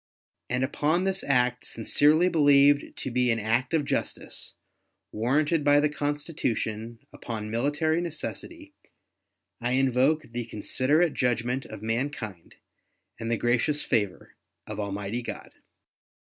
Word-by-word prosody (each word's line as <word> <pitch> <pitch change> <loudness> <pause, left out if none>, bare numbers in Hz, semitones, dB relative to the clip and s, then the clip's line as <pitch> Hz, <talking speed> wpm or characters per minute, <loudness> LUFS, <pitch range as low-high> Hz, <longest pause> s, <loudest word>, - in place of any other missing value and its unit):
And 125 +1 0
upon 150 +6 +1
this 190 0 -1
act, 125 -2 +1
sincerely 150 +9 +3
believed 145 -3 +4
to 130 - -4
be 125 0 +2
an 115 - +2
act 115 +4 0
of 155 -3 +1
justice, - - -4 0.6
warranted 145 +8 +1
by 145 0 +5
the 150 +1 +2
Constitution, 145 -7 -3 0.2
upon 110 -2 -6
military 150 +7 +1
necessity, 300 - -6 0.9
I 120 +1 0
invoke 135 +4 +2
the 120 0 -3
considerate 145 +9 +1
judgment 125 +1 0
of 105 - -9
mankind 115 - -4 0.6
and 115 0 -4
the 115 - +1
gracious 125 +6 +1
favor 105 -7 -1 0.3
of 105 0 -6
Almighty 100 +3 -3
God. - - -7
130 Hz, 120 wpm, -27 LUFS, 115-150 Hz, 0.9 s, by